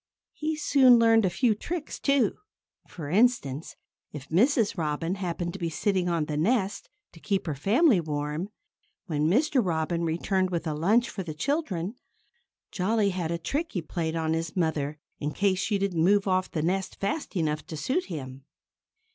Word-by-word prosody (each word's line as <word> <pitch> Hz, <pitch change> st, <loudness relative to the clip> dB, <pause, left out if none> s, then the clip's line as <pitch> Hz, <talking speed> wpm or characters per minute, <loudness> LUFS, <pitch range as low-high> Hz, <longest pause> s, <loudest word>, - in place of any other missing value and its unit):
He 310 Hz, +1 st, -2 dB
soon 270 Hz, -5 st, +5 dB
learned 225 Hz, -2 st, +5 dB
a -, -, +3 dB
few 220 Hz, +6 st, +2 dB
tricks, 310 Hz, +9 st, -5 dB
too. 275 Hz, -6 st, +2 dB, 0.5 s
For 160 Hz, -5 st, -8 dB
instance, 170 Hz, -, +1 dB, 0.4 s
if 140 Hz, -2 st, -9 dB
Mrs. 225 Hz, -, +3 dB
Robin 165 Hz, 0 st, -1 dB
happened 175 Hz, -3 st, -3 dB
to 195 Hz, -, -7 dB
be 170 Hz, -2 st, -1 dB
sitting 180 Hz, +2 st, 0 dB
on 165 Hz, -3 st, 0 dB
the 150 Hz, -1 st, -3 dB
nest, 200 Hz, +3 st, 0 dB, 0.2 s
to 165 Hz, -, -15 dB
keep 195 Hz, +2 st, -1 dB
her 160 Hz, -, -2 dB
family 215 Hz, -, +3 dB
warm, 150 Hz, +3 st, -3 dB, 0.6 s
when 155 Hz, -4 st, 0 dB
Mr. 265 Hz, -, +3 dB
Robin 170 Hz, -1 st, -1 dB
returned 185 Hz, +3 st, 0 dB
with 170 Hz, -2 st, -2 dB
a 155 Hz, -, -1 dB
lunch 210 Hz, +11 st, +2 dB
for 195 Hz, -, -5 dB
the 160 Hz, -4 st, -6 dB
children, 195 Hz, -, -2 dB, 0.8 s
Jolly 205 Hz, +1 st, +1 dB
had 180 Hz, -3 st, -3 dB
a 170 Hz, -, -1 dB
trick 285 Hz, -, -2 dB
that -, -, -22 dB
he 180 Hz, -, -1 dB
played 160 Hz, 0 st, -3 dB
on 160 Hz, -1 st, 0 dB
his 165 Hz, -1 st, -3 dB
mother, 155 Hz, -4 st, -1 dB, 0.2 s
in 150 Hz, 0 st, -3 dB
case 195 Hz, -2 st, +1 dB
she 205 Hz, +1 st, 0 dB
didn't 190 Hz, -5 st, 0 dB
move 200 Hz, +2 st, +3 dB
off 185 Hz, 0 st, +1 dB
the 155 Hz, -, -2 dB
nest 190 Hz, +2 st, -1 dB
fast 200 Hz, +6 st, -3 dB
enough 155 Hz, -3 st, 0 dB
to 155 Hz, -, -6 dB
suit 270 Hz, -, -1 dB
him. 135 Hz, -5 st, -7 dB
180 Hz, 180 wpm, -27 LUFS, 160-215 Hz, 0.8 s, soon